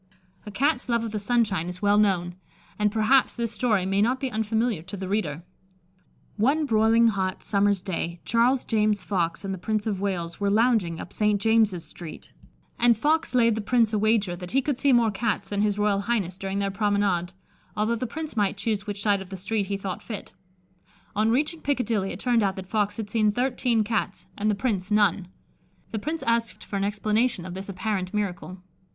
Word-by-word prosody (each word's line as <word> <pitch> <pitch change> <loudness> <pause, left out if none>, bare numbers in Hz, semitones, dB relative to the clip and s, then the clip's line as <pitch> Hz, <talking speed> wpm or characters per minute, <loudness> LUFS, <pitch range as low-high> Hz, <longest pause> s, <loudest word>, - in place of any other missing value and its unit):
A - - -6
Cat's 260 +3 0
love 235 -1 +1
of 225 - -4
the 215 - -2
sunshine 200 -6 0
is 180 +3 -9
well 205 +1 +4
known, 180 -4 +1 0.5
and 210 0 +2
perhaps 225 +5 +3
this 235 -2 -2
story 210 -4 +1
may 195 +1 +1
not 250 +4 +2
be 265 -1 -3
unfamiliar 220 -2 0
to 185 +4 -8
the 190 0 -5
reader: 175 -6 -2 0.9
One 280 +8 +2
broiling 225 -1 +4
hot 190 -3 -2
summer's 200 -2 +1
day 170 -3 -3
Charles 245 +3 +2
James 210 -3 +1
Fox 175 -2 -1
and 195 - -2
the 190 - -6
Prince 215 +2 -1
of 200 -4 -2
Wales 175 -4 -3
were 200 -1 +1
lounging 210 -6 +2
up - - -8
St. 210 -1 +2
James's 215 -5 +2
street, 170 -3 -10 0.5
and 240 -2 +4
Fox 310 +3 +1
laid 230 -2 +4
the 220 - -2
Prince 230 0 +2
a 210 - +2
wager 210 -4 +2
that 180 0 -8
he 270 0 +3
would 285 -4 -1
see 280 - +3
more 235 -3 +4
Cats 210 +2 -2
than 205 0 -1
his 210 -1 +1
Royal 205 -1 +2
Highness 200 -4 -1
during 195 0 -3
their 200 0 0
promenade, 200 -4 0 0.5
although 215 +2 +1
the 245 +2 -2
Prince 310 +4 -6
might 205 -2 +1
choose 210 0 -2
which 205 -1 -4
side 205 -2 +2
of 190 - -10
the 190 - -6
street 200 +2 -2
he 200 0 -2
thought 195 +1 -5
fit. 210 -3 -8 0.8
On 215 +2 +2
reaching 300 +7 +1
Piccadilly, 230 -8 0
it - - -7
turned 240 -1 +2
out 195 -2 +1
that 190 - -7
Fox 205 +1 -1
had 210 -2 -5
seen 215 -2 +3
thirteen 245 -1 +1
Cats 210 -2 -2
and 210 +1 0
the 210 - +2
Prince 200 -4 -2
none. 205 -3 +2 0.6
The 220 - -2
Prince 315 +8 -3
asked 230 -3 0
for - - -7
an 195 - -1
explanation 210 0 0
of 180 - -6
this 190 +2 -7
apparent 190 -1 -2
miracle. 185 -2 -3
210 Hz, 205 wpm, -25 LUFS, 195-230 Hz, 0.9 s, well